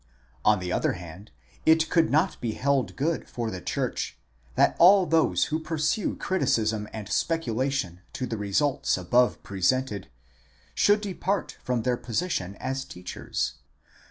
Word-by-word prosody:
On 105 Hz, 0 st, +5 dB
the 90 Hz, -1 st, -4 dB
other -, -, +1 dB
hand, 90 Hz, +4 st, -10 dB, 0.3 s
it 160 Hz, 0 st, +4 dB
could 165 Hz, -2 st, +4 dB
not 160 Hz, +6 st, +1 dB
be 115 Hz, -2 st, -1 dB
held 140 Hz, -2 st, 0 dB
good 160 Hz, +4 st, -1 dB
for 115 Hz, -2 st, -3 dB
the 95 Hz, -, -6 dB
church, -, -, -2 dB, 0.4 s
that -, -, +4 dB
all 190 Hz, +2 st, +7 dB
those 165 Hz, 0 st, +3 dB
who 155 Hz, -, +1 dB
pursue 155 Hz, +5 st, -1 dB
criticism 110 Hz, -, 0 dB
and 110 Hz, -3 st, -6 dB
speculation 130 Hz, -, -1 dB
to 130 Hz, -, -3 dB
the 115 Hz, -, -3 dB
results 105 Hz, +8 st, +1 dB
above 120 Hz, +8 st, +2 dB
presented, 100 Hz, -, 0 dB, 0.7 s
should 205 Hz, 0 st, +4 dB
depart 195 Hz, -1 st, -2 dB
from 125 Hz, -3 st, -1 dB
their 125 Hz, -1 st, +1 dB
position 115 Hz, -, -2 dB
as 135 Hz, +4 st, -3 dB
teachers. 90 Hz, -6 st, -4 dB
130 Hz, 140 wpm, -26 LUFS, 105-160 Hz, 0.7 s, all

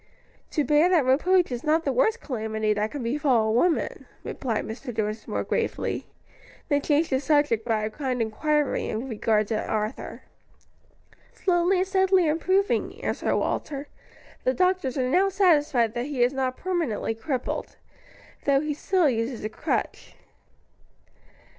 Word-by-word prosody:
"To 300 Hz, -, 0 dB
bear 300 Hz, +4 st, +4 dB
that 340 Hz, -7 st, +3 dB
reproach 345 Hz, +6 st, +3 dB
is 240 Hz, -1 st, -4 dB
not 320 Hz, +1 st, +2 dB
the -, -, 0 dB
worst 470 Hz, -2 st, +2 dB
calamity 220 Hz, -4 st, -1 dB
that 210 Hz, +1 st, -1 dB
can 285 Hz, 0 st, -6 dB
befall 245 Hz, -3 st, +2 dB
a -, -, +2 dB
woman," 320 Hz, +10 st, 0 dB, 0.2 s
replied 230 Hz, -5 st, -3 dB
Mr. 245 Hz, +4 st, -6 dB
Dinsmore 215 Hz, -1 st, -3 dB
gravely; -, -, -2 dB, 0.6 s
then 285 Hz, 0 st, +2 dB
changed 300 Hz, +2 st, +1 dB
the 260 Hz, -, +2 dB
subject 290 Hz, -5 st, +2 dB
by 220 Hz, -2 st, 0 dB
a 215 Hz, -, -2 dB
kind 260 Hz, -1 st, -3 dB
inquiry 290 Hz, +7 st, 0 dB
in 225 Hz, +5 st, -3 dB
regard 215 Hz, -2 st, +1 dB
to 220 Hz, -2 st, -1 dB
Arthur. 215 Hz, +3 st, -4 dB, 1.1 s
"Slowly 360 Hz, 0 st, +2 dB
and 370 Hz, +1 st, +1 dB
steadily 380 Hz, -1 st, +3 dB
improving," 375 Hz, +6 st, +1 dB
answered -, -, -1 dB
Walter. 285 Hz, -1 st, -3 dB, 0.5 s
"The 255 Hz, -, +1 dB
doctors 365 Hz, -4 st, +1 dB
are 255 Hz, -1 st, +1 dB
now 370 Hz, +9 st, +3 dB
satisfied 295 Hz, -, +3 dB
that 240 Hz, +2 st, -3 dB
he 270 Hz, -5 st, +1 dB
is 245 Hz, +2 st, +2 dB
not 260 Hz, -1 st, -1 dB
permanently 335 Hz, -, -1 dB
crippled, 250 Hz, +3 st, -4 dB, 0.7 s
though 275 Hz, -1 st, +4 dB
he 300 Hz, +1 st, -2 dB
still 355 Hz, +3 st, +1 dB
uses 230 Hz, -2 st, -1 dB
a 215 Hz, -, -2 dB
crutch." 215 Hz, -, -3 dB
275 Hz, 145 wpm, -25 LUFS, 230-330 Hz, 1.1 s, bear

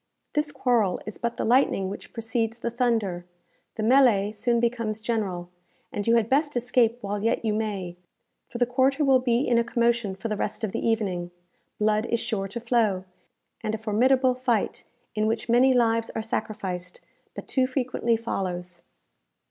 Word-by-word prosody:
This 300 Hz, -1 st, 0 dB
quarrel 240 Hz, -8 st, +1 dB
is 215 Hz, -, -7 dB
but 235 Hz, 0 st, -2 dB
the -, -, -1 dB
lightning 235 Hz, -5 st, +3 dB
which 195 Hz, -, -8 dB
precedes 225 Hz, 0 st, -2 dB
the 235 Hz, 0 st, -3 dB
thunder. 225 Hz, -7 st, 0 dB, 0.5 s
The 220 Hz, -, -3 dB
melée 225 Hz, -5 st, +4 dB
soon 235 Hz, +2 st, +1 dB
becomes 230 Hz, -2 st, -1 dB
general, 195 Hz, -6 st, -2 dB, 0.4 s
and 205 Hz, +1 st, -4 dB
you 230 Hz, -, +5 dB
had 230 Hz, -2 st, +2 dB
best 290 Hz, +1 st, +1 dB
escape 240 Hz, -1 st, +2 dB
while 205 Hz, 0 st, -3 dB
yet 230 Hz, +1 st, 0 dB
you 215 Hz, -, +1 dB
may; 200 Hz, -5 st, -3 dB, 0.5 s
for -, -, -6 dB
the 245 Hz, -, +3 dB
quarter 265 Hz, +4 st, +2 dB
will 265 Hz, -1 st, +5 dB
be 245 Hz, +1 st, +1 dB
in 235 Hz, -1 st, +4 dB
a -, -, +2 dB
commotion 235 Hz, -4 st, 0 dB
for 210 Hz, -, -5 dB
the 215 Hz, -, -1 dB
rest 210 Hz, +2 st, -3 dB
of 215 Hz, -, -1 dB
the -, -, -3 dB
evening. 195 Hz, -6 st, 0 dB, 0.5 s
Blood 215 Hz, +1 st, +1 dB
is 235 Hz, -, 0 dB
sure 220 Hz, -4 st, -2 dB
to 205 Hz, +5 st, -6 dB
flow, 225 Hz, -5 st, +1 dB, 0.6 s
and 215 Hz, 0 st, -2 dB
a -, -, -4 dB
formidable 250 Hz, +4 st, +3 dB
fight, 250 Hz, -4 st, -1 dB, 0.3 s
in 215 Hz, 0 st, 0 dB
which 225 Hz, +1 st, -1 dB
many 250 Hz, +3 st, +5 dB
lives 230 Hz, -2 st, +2 dB
are 225 Hz, -, -1 dB
sacrificed, 185 Hz, -5 st, -4 dB, 0.4 s
but -, -, -8 dB
too 260 Hz, -1 st, +2 dB
frequently 250 Hz, -3 st, 0 dB
follows. 180 Hz, -5 st, -4 dB
230 Hz, 175 wpm, -26 LUFS, 210-245 Hz, 0.6 s, you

